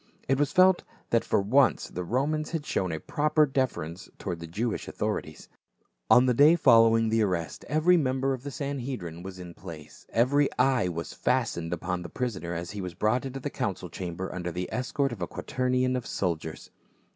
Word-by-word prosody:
It 135 +1 +2
was 145 - +2
felt 185 0 +5 0.3
that 115 - +3
for - - +2
once 130 +7 +3
the 90 - -5
Romans 145 - -1
had 160 -3 -2
shown 95 - -1
a 80 - -3
proper 150 - +2
deference 125 - -2
toward 90 -4 -4
the 85 - -7
Jewish 110 +7 -2
authorities. - - -4 0.6
On 125 +1 +7
the 125 - +3
day 145 +7 +7
following 115 -6 +5
the 110 0 +2
arrest 90 -7 -2
every 155 +4 +4
member 135 -2 +1
of 130 - -5
the 140 - -6
Sanhedrim 130 - -5
was 95 0 -8
in 90 -1 -8
his 85 - -14
place; 80 -5 -10
every 140 +5 +3
eye 130 -7 +3
was 85 -2 -4
fastened 110 -10 0
upon 90 +1 -2
the 85 - -7
prisoner, 95 -9 -3
as 85 +1 -4
he 105 -1 -5
was 90 -2 -6
brought 115 +8 +1
into 135 +1 -6
tlie 145 +2 -5
council 95 -8 -3
chamber 90 +1 -5
under 90 -1 -4
the 90 +2 -4
escort 135 +2 -1
of 120 - -7
a - - -1
quaternion 130 0 0
of 125 - -3
soldiers. 80 -4 -3
115 Hz, 190 wpm, -28 LUFS, 90-135 Hz, 0.6 s, On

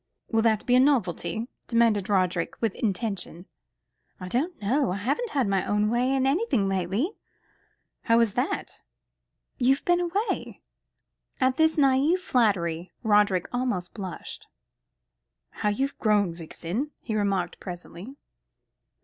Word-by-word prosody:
"Will 225 -1 +3
that 220 -2 +2
be 245 - +2
a - - +6
novelty?" 235 - +1 0.2
demanded 230 -4 +2
Roderick, 185 -3 0
with 225 - 0
intention. 195 -4 -3 0.7
"I 185 - -7
don't 315 - -1
know. 250 +4 +1
I - - -1
haven't 280 - -1
had 270 - 0
my 195 -1 +1
own 210 +1 +1
way 245 +2 +1
in 265 -1 +1
anything 275 - +1
lately." 195 - 0 0.9
"How 230 0 +4
is 230 -4 +2
that?" 250 +5 -2 0.8
"You 260 +2 +4
have - - -13
been 350 0 +3
away." 370 +6 -2 0.8
At 260 +1 +2
this 320 0 +3
naïve 280 +4 +4
flattery, 185 - 0
Roderick 205 -4 +3
almost 245 -8 -2
blushed. 195 -4 -7 1.0
"How 210 - -1
you've 270 +7 -2
grown. 205 -5 +2
Vixen," 170 - -4
he 225 - -4
remarked 195 -4 -1
presently. 180 +6 -9
225 Hz, 130 wpm, -26 LUFS, 195-265 Hz, 1.0 s, a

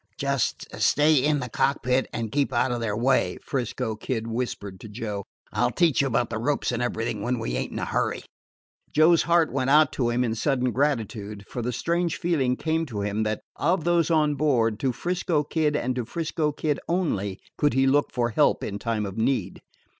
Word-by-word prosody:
"Just 140 -2 -1 0.2
stay 150 +2 +4
in 145 +1 +2
the 125 - -3
cockpit 130 +1 +1
and 115 -2 -4
keep 140 +1 +1
out 130 - +1
of 120 - -1
their 105 -3 -2
way," 130 +3 +2
'Frisco 120 -4 -2
Kid 115 +1 -3
whispered 115 -5 -4
to 110 - -10
Joe. 105 -2 -5 0.3
"I - - +1
'll - - +3
teach 165 -6 +3
you 140 - +1
about 120 -2 0
the 110 - -2
ropes 140 +4 0
and 120 0 -2
everything 115 -3 -2
when 125 +4 -1
we - - -3
ain't - - -2
in - - -5
a - - -2
hurry." - - -1 0.7
Joe's 160 +2 +5
heart 170 -3 +2
went 130 -1 0
out 150 +1 +5
to 120 -3 0
him 120 +1 +1
in 115 -2 0
sudden 125 +1 0
gratitude, 110 -7 -2
for 120 - -5
the 120 +2 -2
strange 170 +6 -1
feeling 140 -8 +1
came 160 +3 -1
to 105 -6 -4
him 105 +1 -1
that 110 0 -1 0.2
of 170 +2 +1
those 170 -1 +2
on 155 -2 +3
board, 120 -7 +1
to 135 - +1
'Frisco 175 +1 -1
Kid, 150 0 0
and 130 -3 -1
to 125 - -1
'Frisco 155 +4 -2
Kid 150 0 -1
only, 105 - -1 0.2
could 145 -2 +1
he 135 0 +4
look 145 +2 +2
for 120 -2 0
help - - +2
in 100 0 -4
time 110 -2 -1
of 100 +2 -5
need. 110 -6 0
130 Hz, 205 wpm, -25 LUFS, 115-150 Hz, 0.7 s, Joe's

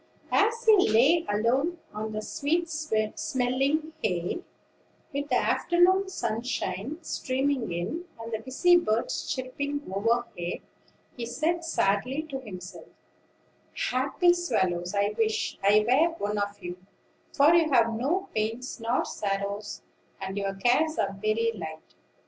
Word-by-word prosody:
As 455 +2 +2
he 425 - +6
lay 275 +10 +4
alone 250 +11 +1 0.2
on 215 +1 -4
the 215 0 -4
sweet 330 +8 0
smelling 280 +2 0
hay, 180 - -1 0.7
with 285 +1 -3
the 250 - +2
afternoon 370 +2 +3
sunshine 235 - -3
streaming 265 - -1
in, 175 - -3
and 230 0 -7
the 220 - -1
busy 270 +10 +4
birds 230 -9 -1
chirping 280 +3 -3
overhead, 225 -4 -1 0.5
he 235 -2 -5
said 315 +8 -1
sadly 260 -1 0
to 270 - -3
himself: 185 -7 -9 1.0
"Happy 280 +8 +3
swallows, 185 - -1
I 200 +1 +1
wish 220 -1 0
I 210 +2 +5
were 320 +7 +3
one 210 -7 -2
of 205 0 -3
you; 175 0 -5 0.5
for 295 +3 +5
you 330 -3 +4
have 230 -3 +4
no 315 - -1
pains 225 +4 -2
nor 230 +2 0
sorrows, 200 +1 -3 0.4
and 190 0 -5
your 195 -1 -2
cares 255 +10 +2
are 200 -2 0
very 220 +2 +1
light. 160 -5 -8
245 Hz, 130 wpm, -27 LUFS, 210-310 Hz, 1.0 s, he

